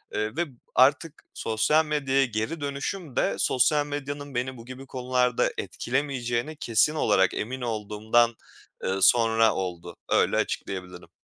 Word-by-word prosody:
Iıı 110 Hz, +2 st, -2 dB
ve 175 Hz, -, +1 dB, 0.3 s
artık 145 Hz, +4 st, +3 dB
sosyal 130 Hz, +8 st, +1 dB
medyaya 135 Hz, -3 st, +1 dB
geri 120 Hz, +7 st, -3 dB
dönüşüm 145 Hz, +2 st, -4 dB
de -, -, +1 dB
sosyal 145 Hz, +3 st, +2 dB
medyanın 145 Hz, -1 st, -6 dB
beni 130 Hz, +1 st, -2 dB
bu 115 Hz, -, -11 dB
gibi 130 Hz, +2 st, -9 dB
konularda 125 Hz, -1 st, 0 dB
etkilemeyeceğine 130 Hz, +1 st, -2 dB
kesin 120 Hz, +4 st, +2 dB
olarak 95 Hz, -9 st, +3 dB
emin 130 Hz, +4 st, -4 dB
olduğumdan, 110 Hz, +1 st, +1 dB, 0.5 s
ııı, 95 Hz, +1 st, -1 dB
sonra 115 Hz, +1 st, +4 dB
oldu. 90 Hz, -3 st, -5 dB
Öyle -, -, +3 dB
açıklayabilirim. 90 Hz, -2 st, -4 dB
125 Hz, 130 wpm, -26 LUFS, 110-145 Hz, 0.5 s, sonra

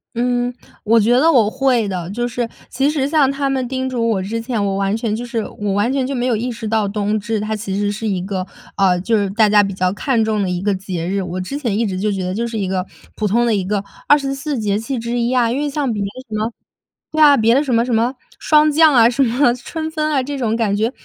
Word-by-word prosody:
嗯， 245 Hz, 0 st, 0 dB, 0.3 s
我 225 Hz, +2 st, +4 dB
觉 220 Hz, +3 st, +2 dB
得 325 Hz, +3 st, +5 dB
我 225 Hz, -7 st, +4 dB
会 255 Hz, -4 st, +1 dB
的。 180 Hz, -2 st, -4 dB
就 240 Hz, +3 st, -2 dB
是 240 Hz, 0 st, -2 dB, 0.2 s
其 270 Hz, +3 st, +1 dB
实 280 Hz, -3 st, 0 dB
像 290 Hz, -3 st, +3 dB
他 275 Hz, 0 st, -1 dB
们 260 Hz, -2 st, -1 dB
叮 260 Hz, 0 st, -2 dB
嘱 230 Hz, -2 st, -1 dB
我 195 Hz, -4 st, 0 dB
之 225 Hz, +4 st, -3 dB
前， 230 Hz, -4 st, -2 dB
我 195 Hz, -1 st, -1 dB
完 195 Hz, +1 st, 0 dB
全 225 Hz, -2 st, -2 dB
就 240 Hz, +2 st, -5 dB
是 230 Hz, -3 st, -2 dB, 0.2 s
我 205 Hz, -1 st, -1 dB
完 205 Hz, +5 st, +1 dB
全 265 Hz, -2 st, 0 dB
就 275 Hz, -, -3 dB
没 245 Hz, 0 st, -1 dB
有 245 Hz, -3 st, +1 dB
意 245 Hz, +3 st, -2 dB
识 225 Hz, -1 st, -6 dB
到 215 Hz, -2 st, +1 dB
冬 210 Hz, +1 st, -1 dB
至 215 Hz, +1 st, -2 dB
它 215 Hz, +1 st, -2 dB
其 200 Hz, -2 st, -4 dB
实 205 Hz, 0 st, 0 dB
是 215 Hz, +1 st, -4 dB
一 190 Hz, -3 st, -1 dB
个 185 Hz, -1 st, -3 dB, 0.3 s
呃， 185 Hz, -2 st, +3 dB
就 225 Hz, +3 st, +1 dB
是 200 Hz, -2 st, 0 dB
大 215 Hz, +1 st, +4 dB
家 210 Hz, 0 st, +6 dB
比 195 Hz, -1 st, -2 dB
较 185 Hz, -1 st, 0 dB
看 230 Hz, 0 st, 0 dB
重 215 Hz, -2 st, 0 dB
的 190 Hz, -, -1 dB
一 180 Hz, 0 st, -2 dB
个 205 Hz, 0 st, +1 dB
节 185 Hz, -3 st, -4 dB
日。 195 Hz, +1 st, -1 dB
我 180 Hz, 0 st, -4 dB
之 275 Hz, +10 st, -4 dB
前 230 Hz, -8 st, -1 dB
一 230 Hz, -, +1 dB
直 185 Hz, -2 st, -3 dB
就 210 Hz, +1 st, 0 dB
觉 190 Hz, -2 st, -2 dB
得 185 Hz, +1 st, -2 dB
就 235 Hz, +3 st, -2 dB
是 230 Hz, -1 st, -5 dB
一 195 Hz, -2 st, -1 dB
个 185 Hz, 0 st, -1 dB, 0.3 s
普 215 Hz, -, -1 dB
通 235 Hz, +4 st, +2 dB
的 230 Hz, -, +2 dB
一 195 Hz, -2 st, 0 dB
个 200 Hz, +1 st, -1 dB, 0.2 s
24 275 Hz, 0 st, +1 dB
节 205 Hz, -2 st, 0 dB
气 255 Hz, +3 st, -4 dB
之 235 Hz, +1 st, -2 dB
一 235 Hz, +1 st, 0 dB
啊， 235 Hz, -2 st, +2 dB
因 265 Hz, -, -1 dB
为 295 Hz, 0 st, -1 dB
像 275 Hz, -3 st, -1 dB
别 205 Hz, -, -3 dB
的 200 Hz, -, -1 dB, 0.2 s
什 -, -, -8 dB
么 220 Hz, +2 st, -1 dB, 0.6 s
对 310 Hz, 0 st, 0 dB
啊， 290 Hz, -2 st, +7 dB
别 225 Hz, +1 st, +3 dB
的 285 Hz, -, +3 dB
什 260 Hz, -4 st, -1 dB
么 230 Hz, +1 st, +3 dB
什 245 Hz, -, -2 dB
么 235 Hz, +4 st, +1 dB, 0.3 s
霜 305 Hz, -1 st, +4 dB
降 310 Hz, -1 st, +5 dB
啊， 235 Hz, -1 st, +6 dB
什 270 Hz, +3 st, +1 dB
么 245 Hz, +1 st, +3 dB
春 315 Hz, +6 st, -5 dB
分 310 Hz, -1 st, -1 dB
啊， 270 Hz, -3 st, +1 dB
这 285 Hz, +1 st, -4 dB
种 225 Hz, -3 st, 0 dB
感 215 Hz, -3 st, 0 dB
觉， 220 Hz, +4 st, 0 dB
230 Hz, 295 characters per minute, -18 LUFS, 205-255 Hz, 0.6 s, 啊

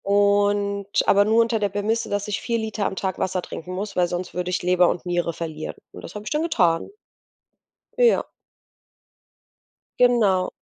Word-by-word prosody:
Und, 200 Hz, 0 st, +2 dB, 0.2 s
aber 200 Hz, 0 st, +5 dB
nur 220 Hz, +2 st, +4 dB
unter 230 Hz, -1 st, +1 dB
der 205 Hz, -1 st, 0 dB
Prämisse, 210 Hz, +4 st, -1 dB
dass 205 Hz, 0 st, -2 dB
ich 210 Hz, -, -3 dB
4 235 Hz, 0 st, -1 dB
Liter 220 Hz, -2 st, -2 dB
am -, -, -5 dB
Tag 190 Hz, -1 st, -3 dB
Wasser 185 Hz, 0 st, -1 dB
trinken 180 Hz, +3 st, -8 dB
muss, 200 Hz, +3 st, -5 dB
weil 180 Hz, -1 st, +2 dB
sonst 180 Hz, +1 st, -4 dB
würde 180 Hz, 0 st, -3 dB
ich 180 Hz, -, -2 dB
Leber 180 Hz, 0 st, +4 dB
und 175 Hz, -, -3 dB
Niere 175 Hz, -1 st, 0 dB
verlieren. 155 Hz, -2 st, -6 dB, 0.2 s
Und -, -, -11 dB
das -, -, -10 dB
habe 210 Hz, -, -6 dB
ich -, -, -6 dB
dann 300 Hz, -, +1 dB
getan. 175 Hz, -, +1 dB, 1.1 s
Ja. 485 Hz, -1 st, +3 dB, 1.7 s
Genau. 215 Hz, -7 st, +3 dB
200 Hz, 175 wpm, -23 LUFS, 180-215 Hz, 1.7 s, aber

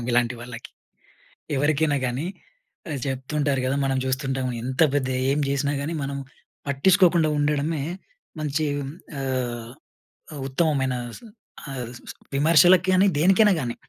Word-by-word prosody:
సమాధానం. -, -, -5 dB
ఇలాంటి 120 Hz, 0 st, +2 dB
వాళ్ళకి. 120 Hz, -1 st, -9 dB, 0.9 s
ఎవరికైనా 145 Hz, +1 st, +2 dB
గానీ 125 Hz, +5 st, -2 dB, 0.6 s
ఆహ్, 140 Hz, -3 st, -3 dB
చెప్తుంటారు 135 Hz, +1 st, -1 dB
కదా! 130 Hz, +2 st, 0 dB
మనం 135 Hz, -1 st, 0 dB
చూస్తుంటాం 130 Hz, 0 st, -1 dB, 0.2 s
ఎంత 130 Hz, +4 st, -2 dB
పెద్ద, 140 Hz, -2 st, +1 dB, 0.2 s
ఏం 145 Hz, -, +1 dB
చేసినా 140 Hz, +1 st, 0 dB
గానీ 160 Hz, +4 st, -3 dB
మనం 140 Hz, 0 st, -3 dB, 0.5 s
పట్టిచుకోకుండా 170 Hz, +2 st, +4 dB
ఉండడమే 145 Hz, +1 st, 0 dB, 0.6 s
మంచి 155 Hz, +1 st, -1 dB, 0.5 s
ఆహ్, 125 Hz, -3 st, -3 dB, 0.7 s
ఉ -, -, -3 dB
ఉత్తమమైన 135 Hz, -3 st, +1 dB, 0.2 s
స్ -, -, -19 dB, 0.5 s
ఆహ్, 125 Hz, -3 st, -5 dB, 0.2 s
స్ -, -, -8 dB, 0.2 s
విమర్శలకి 170 Hz, +5 st, +5 dB
గానీ, 190 Hz, +2 st, +5 dB
దేనికైనా 195 Hz, +5 st, +5 dB
గానీ, 120 Hz, -3 st, -3 dB
140 Hz, 125 wpm, -24 LUFS, 130-155 Hz, 0.9 s, విమర్శలకి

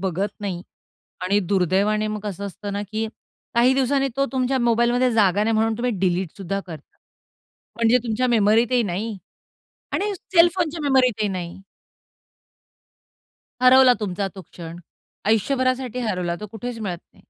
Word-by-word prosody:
बघत 190 Hz, +2 st, -2 dB
नाही 185 Hz, -4 st, -4 dB, 0.6 s
आणि 200 Hz, +3 st, +2 dB
दुर्दैवाने 200 Hz, +3 st, +2 dB
मग 215 Hz, 0 st, -3 dB
कसं 200 Hz, -1 st, -5 dB
असतं 200 Hz, +1 st, -6 dB
ना, 205 Hz, -, -2 dB
की 220 Hz, 0 st, -1 dB, 0.5 s
काही 245 Hz, +2 st, +5 dB
दिवसांनी 270 Hz, +1 st, +1 dB
तो 275 Hz, -, +3 dB
तुमच्या 260 Hz, 0 st, 0 dB
मोबाईलमध्ये 240 Hz, +1 st, +2 dB
जागा 205 Hz, -2 st, +3 dB
नाही 225 Hz, +1 st, +1 dB
म्हणून 225 Hz, +1 st, +2 dB
तुम्ही 245 Hz, +1 st, 0 dB
डिलीटसुद्धा 190 Hz, +1 st, -1 dB
करता. 155 Hz, -4 st, -11 dB, 0.8 s
म्हणजे 230 Hz, +1 st, +4 dB
तुमच्या 235 Hz, +2 st, 0 dB
मेमरीतही 230 Hz, +2 st, +3 dB
नाही 205 Hz, +2 st, -3 dB, 0.8 s
आणि 415 Hz, +1 st, 0 dB
सेलफोनच्या 340 Hz, -2 st, +2 dB
मेमरीतही 255 Hz, -6 st, +2 dB
नाही. 185 Hz, -1 st, -5 dB, 2.0 s
हरवला 255 Hz, 0 st, +7 dB
तुमचा 200 Hz, -1 st, -2 dB
तो 190 Hz, -, -8 dB
क्षण, 170 Hz, -1 st, -10 dB, 0.5 s
आयुष्यभरासाठी 255 Hz, +3 st, 0 dB
हरवला. 180 Hz, -7 st, -2 dB
तो 210 Hz, -, -7 dB
कुठेच 230 Hz, +1 st, -6 dB
मिळत 190 Hz, -5 st, -3 dB, 0.2 s
नाही. -, -, -22 dB
220 Hz, 130 wpm, -22 LUFS, 195-250 Hz, 2.0 s, हरवला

